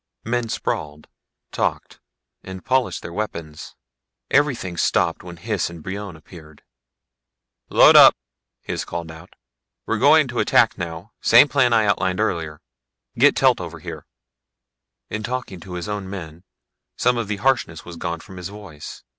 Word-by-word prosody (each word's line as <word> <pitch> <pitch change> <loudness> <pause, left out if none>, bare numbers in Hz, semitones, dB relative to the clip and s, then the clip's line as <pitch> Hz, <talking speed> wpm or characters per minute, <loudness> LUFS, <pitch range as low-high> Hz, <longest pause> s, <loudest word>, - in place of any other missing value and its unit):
Men 120 0 -2
sprawled, 75 -7 -4 0.4
talked, - - -3 0.4
and 95 -1 -9
polished 130 -8 0
their 85 - -7
weapons. 85 -7 -6 0.6
Everything 130 -11 +1
stopped 85 0 +1
when 90 -1 -10
Hys 100 0 -2
and 85 -2 -11
Brion 100 -1 -6
appeared. 80 -2 -15 1.1
"Load - - +7
up," - - +9 0.5
Hys - - -3
called 85 -1 -6
out. 80 +2 -14 0.5
"We're - - -1
going - - +5
to - - -3
attack - - +3
now, 85 +4 -7
same 120 +5 +7
plan 135 -4 +2
I 110 -2 +4
outlined 95 -2 0
earlier. 80 -3 -2 0.6
Get - - +6
Telt - - +3
over - - -7
here." - - -9 1.0
In 110 - -3
talking 120 -5 -5
to 90 +2 -10
his 90 +1 -5
own 105 -2 -4
men 85 -2 -8 0.5
some 125 - +2
of 115 - -3
the 105 - -2
harshness 110 -9 0
was 85 - -9
gone 85 0 -4
from 95 - -13
his 90 +1 -6
voice. 100 -8 -11
95 Hz, 150 wpm, -22 LUFS, 85-110 Hz, 1.1 s, up